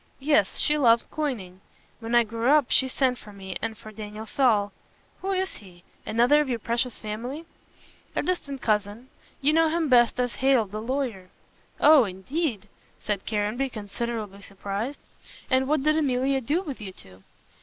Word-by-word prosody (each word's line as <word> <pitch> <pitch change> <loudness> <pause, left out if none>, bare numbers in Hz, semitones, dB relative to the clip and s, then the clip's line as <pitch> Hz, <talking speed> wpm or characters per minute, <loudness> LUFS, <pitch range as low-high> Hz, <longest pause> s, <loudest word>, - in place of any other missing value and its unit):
Yes, 300 +2 +2
she 300 0 +2
loved 235 -4 +4
coining. 215 -12 -4 0.4
When 230 +1 -2
I 240 - +6
grew 230 +2 -1
up 295 -3 +4
she 265 - +4
sent 255 -1 0
for 210 - -12
me 190 -2 -8
and 225 -1 -3
for 215 - -11
Daniel 215 0 -8
Saul 215 -5 +2 0.3
" - - -35
"Who 385 - -3
is 380 0 -1
he? 180 -3 -16 0.2
Another 245 +7 +4
of 290 - -2
your 240 - 0
precious 235 +2 -2
family." 240 +9 -6 0.7
"A - - 0
distant 280 -7 -3
cousin. 215 +3 -1 0.3
You 290 +3 +4
know 325 0 +4
him 325 -1 0
best 240 -1 +4
as 245 -1 -1
Hale 265 -4 +3
the 210 +2 -6
lawyer." 235 -7 -3 0.5
"Oh, 295 -4 +7
indeed," 215 - -3 0.3
said 205 -2 -3
Caranby, 220 +5 -1
considerably 215 -2 -5
surprised, 200 +7 -5 0.5
"and 260 0 +3
what 295 -1 +1
did 305 +1 +3
Emilia 270 -2 +1
do 300 +10 0
with 275 - -7
you 190 -3 -7
two?" 95 - -16
240 Hz, 170 wpm, -26 LUFS, 210-275 Hz, 0.7 s, Oh